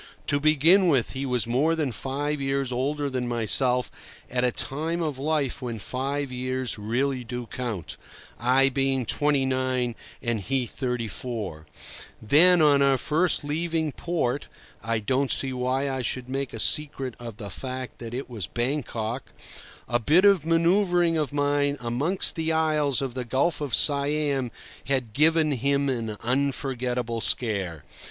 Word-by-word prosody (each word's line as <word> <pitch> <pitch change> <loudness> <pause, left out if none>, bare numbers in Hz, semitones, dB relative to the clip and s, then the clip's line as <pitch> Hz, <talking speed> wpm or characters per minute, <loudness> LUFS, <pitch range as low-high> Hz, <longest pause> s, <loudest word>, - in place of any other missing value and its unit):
To 145 - +1
begin 155 +6 +5
with, 135 -8 +2
he 135 +1 -3
was 125 -4 0
more 135 +8 +1
than 150 -5 -1
five 140 +5 -3
years 135 -1 -1
older 140 +4 -1
than 130 -2 -2
myself 125 +2 +1 0.4
at 125 0 0
a 125 - +3
time 160 +8 -2
of 150 -4 -3
life 145 -2 -1
when 120 -3 -4
five 135 +5 -3
years 130 -1 -2
really 125 +5 -1
do 125 +1 -5
count, 115 -8 -5 0.4
I 130 +3 +4
being 135 -1 0
twenty 145 +2 +2
nine 130 -2 0 0.3
and 120 -2 -1
he 130 +5 -1
thirty 125 -2 -3
four; 100 -9 -5 0.5
then, 160 +9 +5
on 145 -2 +5
our 135 -1 +4
first 160 +6 +2
leaving 160 +1 -1
port 145 -5 -2 0.3
(I 115 0 -1
don't 130 +5 0
see 135 -1 +2
why 130 +2 -1
I 130 -1 -2
should 125 +1 -2
make 135 0 -3
a 115 - -7
secret 135 -1 +1
of 115 -3 -8
the 100 -3 -7
fact 130 -1 -6
that 115 0 -6
it 135 - -4
was 110 -8 -4
Bangkok), 120 -2 -3 0.6
a 120 - +1
bit 160 - +4
of 190 -6 +4
manoeuvring 175 0 +3
of 150 -3 -1
mine 145 0 +1
amongst 135 +11 +2
the 160 -1 0
islands 150 -4 +1
of 130 -3 -4
the 130 0 -3
Gulf 135 +7 0
of 145 -4 0
Siam 140 -2 +2 0.4
had 130 -5 -1
given 155 +2 +3
him 140 +1 +1
an 115 -4 -3
unforgettable 125 -2 -1
scare. 100 - 0
135 Hz, 155 wpm, -25 LUFS, 125-145 Hz, 0.6 s, begin